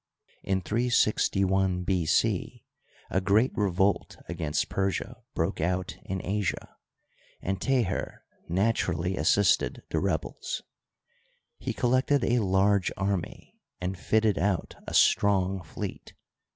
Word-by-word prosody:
In 95 -1 0
361 95 -4 +1
B. 90 -3 0
c. - - 0 0.5
a 95 - +1
g^eat 105 +7 +3
revolt 100 0 +1
against 75 -2 -1
Persia 95 -1 -2 0.2
broke 85 +1 -1
out 90 +2 -1
in 95 -1 -4
Asia, 100 0 -2 0.6
and 95 0 -3
Teher 125 -9 0 0.3
naturally 90 -2 0
assisted 100 0 +2
the - - +1
rebels. - - -2 1.0
He - - -3
col 120 - 0
lected 130 +1 +3
a 120 +1 +2
large 100 -1 +2
army 95 -2 -3 0.2
and 90 +1 -3
fitted 110 +2 +1
out 95 -1 0
a - - -3
strong 95 -2 +3
fleet. 80 - -7
95 Hz, 110 wpm, -28 LUFS, 90-105 Hz, 1.0 s, g^eat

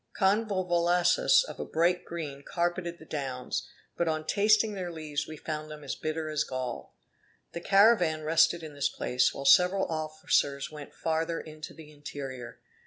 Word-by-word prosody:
Convolvaluses 190 - +3
of - - -9
a - - -2
bright 175 +2 +1
green 150 -5 -6
carpeted 175 +2 -2
the 160 - -14
downs; 135 -5 -4 0.3
but 170 - 0
on 155 -1 -1
tasting 215 +3 +3
their 185 -3 -4
leaves 150 -2 -4
we 155 - -8
found 155 0 -5
them 150 -1 -9
as 140 - -4
bitter 155 0 -3
as 155 -1 0
gall. 130 -2 -5 0.6
The 170 - -6
caravan 195 -6 +4
rested 165 +2 +3
in 155 -2 -8
this 140 -1 0
place, 125 0 +1
while 140 - -7
several 180 +7 +5
officers 155 -3 -1
went 150 -2 -10
farther 165 +1 -1
into 155 0 -9
the 155 -2 -13
interior. 135 -4 -8
160 Hz, 160 wpm, -29 LUFS, 150-175 Hz, 0.6 s, several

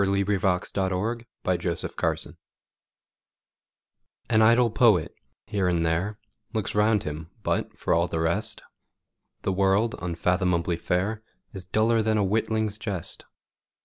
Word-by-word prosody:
Coventry 100 0 +1 0.3
Patmore 95 +5 -1 0.2
The 90 -1 +1 0.2
Revelation - - -3 1.9
AN 110 - +5
idle 115 +1 +5
poet, 105 -7 +3 0.3
here 100 -3 0
and 85 -2 +1
there, 90 +6 0 0.4
Looks 110 -3 -1
round 105 0 +3
him, 75 +2 -6
but, - - -1
for - - 0
all 85 +1 +2
the 80 - -2
rest, 80 +1 -1 0.8
The 95 - 0
world, 100 +4 +2
unfathomably 90 0 0
fair, 95 +6 -1 0.3
Is 95 -3 -6
duller 110 +4 +2
than 110 0 +1
a 105 - +3
witling's 110 +1 0
jest. 100 -6 -4
100 Hz, 120 wpm, -26 LUFS, 90-110 Hz, 1.9 s, AN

